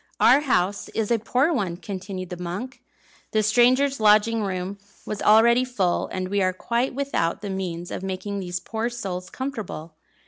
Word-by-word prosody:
"Our 255 +4 +6
house 200 -9 0
is 225 0 -1
a 230 - +3
poor 255 +9 +1
one," 190 - -1
continued 185 -1 -6
the 180 - -4
monk. 185 +10 -5 0.5
"The 215 0 +3
strangers' 255 +5 +3
lodging 215 +1 +4
room 190 0 -3 0.3
was 210 - -4
already 235 +3 +6
full, 200 -9 0
and 185 0 -4
we 200 0 +1
are 185 0 +2
quite 235 +7 -1
without 270 -11 -1
the 200 - -3
means 175 -2 -4
of - - -4
making 190 +1 -4
these 180 -1 -3
poor 225 +5 -3
souls 190 -7 -5
comfortable. 220 - -5
205 Hz, 170 wpm, -24 LUFS, 185-240 Hz, 0.5 s, Our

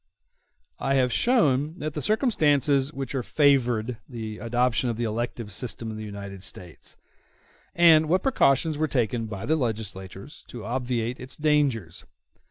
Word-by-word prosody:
I 135 - 0
have 125 -3 +2
shown 155 - +2
what 155 -2 -4
the 150 - -4
circumstances 145 - +2
are 150 - -16
which 135 -1 -4
favored 125 -4 +1
the 110 -3 -6
adoption 120 +1 0
of 115 - -3
the 120 - -2
elective 115 -1 -3
system 115 +2 -3
in 110 - -7
the 110 - -6
United 100 -2 -8
States, 90 -3 -8 0.8
and 160 -2 +6
what 185 +2 +2
precautions 155 - +2
were 155 - +1
taken 120 -4 -1
by 105 0 -6
the 160 - +2
legislators 110 - -5
to 115 -4 -9
obviate 120 0 -2
its 130 +1 -8
dangers. 145 - 0
125 Hz, 150 wpm, -25 LUFS, 110-150 Hz, 0.8 s, and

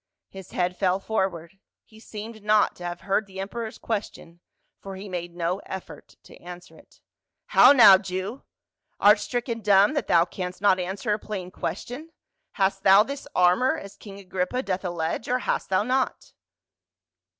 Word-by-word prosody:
His 190 -1 -11
head 180 0 -1
fell 185 0 +1
forward; 190 -4 -3 0.2
he 220 - -19
seemed 220 0 -9
not 210 0 +2
to 180 - -10
have 175 0 -5
heard 200 +1 -1
the 190 0 -10
emperor's 220 +3 -5
question 200 -6 -6 0.4
for 195 -1 -9
he 195 +2 -9
made 175 -2 -6
no 175 +2 -2
effort 190 -1 -9
to - - -15
answer 175 0 -12
it. - - -21 0.2
" - - -60
How - - +9
now, 215 -9 +8
Jew! 190 +5 -5 0.6
art 210 +1 +6
stricken 235 +2 -3
dumb 205 +3 +4
that 290 - -2
thou 170 -1 +4
canst 180 0 -6
not 190 -1 +3
answer 195 +4 -2
a 210 - -2
plain 190 -4 -6
question? 275 - -6 0.4
Hast 195 0 0
thou 195 +2 +6
this 280 +4 -7
armor, 180 +9 +3
as 200 0 -10
king 200 -2 -12
Agrippa 190 +6 -3
doth 190 -3 -3
allege, 175 +2 -3
or 250 - +2
hast 255 - -2
thou 190 +1 +2
not?" 255 +3 -2
195 Hz, 170 wpm, -25 LUFS, 180-220 Hz, 0.6 s, How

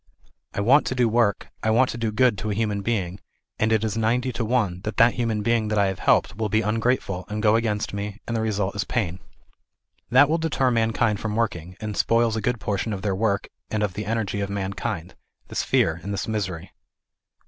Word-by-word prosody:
I - - 0
want 135 +8 +5
to 130 - -1
do 125 -2 +3
work, 110 -3 +1
I 110 - 0
want 125 +4 +3
to - - -6
do 115 -2 0
good 120 +1 +3
to 110 - -3
a 105 - -1
human 105 -2 -1
being, 100 -4 -2 0.4
and 110 0 +2
it 110 -1 +2
is 110 -2 -1
90 120 +3 +1
to 120 0 -2
1 105 -6 0
that 105 - -4
that 115 +1 +6
human 115 -3 -1
being 115 -1 +1
that. 105 0 -1
I 100 - +4
have 95 - -5
helped 100 - +2
will 110 -1 -1
be 110 +3 +2
ungrate 115 +4 +1
ful, 90 -2 -5
and 105 0 -3
go 105 0 +5
against 110 -3 -1
me, 100 +1 -4
and 115 - -3
the 110 - 0
result 105 -3 -1
is 105 - 0
pain. 95 -7 -2 0.9
That 135 +4 +6
will 165 +3 +1
deter 145 -5 +1
mankind 115 -2 +1
from 110 -1 -3
working, 90 -6 -2
and 105 -1 -4
spoil 115 -1 +2
a 110 - -1
good 120 +2 0
portion 105 +1 -2
of 95 -1 -5
their 100 -2 0
work 100 0 0 0.2
and 110 -1 -1
of 100 -3 -1
the 105 +2 -5
energy 110 -3 -1
of 100 - -2
mankind, 95 -3 -3 0.4
this - - -1
fear 80 0 +1
and 100 - -5
this 100 -2 -3
misery. 95 -6 -3
110 Hz, 225 wpm, -24 LUFS, 100-115 Hz, 0.9 s, that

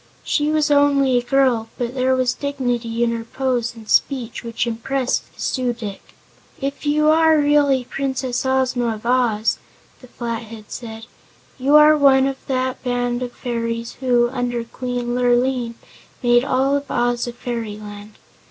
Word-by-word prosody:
She 295 -1 0
was 305 -1 +1
only 280 -3 +4
a - - -6
girl, 245 -4 +2
but 245 0 -3
there 260 0 +1
was 255 -1 +1
dignity 245 -5 -2
in 235 - +1
her 230 -1 -3
pose 245 -1 -2
and 220 -2 -13
speech 245 -3 0
which 230 0 -2
impressed 245 +3 -2
the - - -25
Su 250 -2 -1
dic. 215 -4 -7 0.6
"If 280 +1 -4
you 305 +1 +3
are 320 0 +5
really 290 -3 +3
Princess 260 -1 -2
Ozma 255 -3 0
of 215 - -13
Oz," 235 -3 +1 0.4
the 255 - -15
Flathead 230 -3 -6
said, 225 -2 -7 0.5
"you 275 +3 +3
are 300 0 +8
one 270 -2 +5
of 270 -1 -2
that 260 -1 -2
band 245 -1 -1
of 250 -1 -4
fairies 230 -1 -4
who, 245 -2 +3
under 245 -2 -2
Queen 245 0 -4
Lurline, 245 -1 +1 0.5
made 240 0 +4
all 275 +1 +1
Oz 240 0 0
a 240 - -5
Fairyland. 210 -3 -6
245 Hz, 150 wpm, -20 LUFS, 235-270 Hz, 0.6 s, are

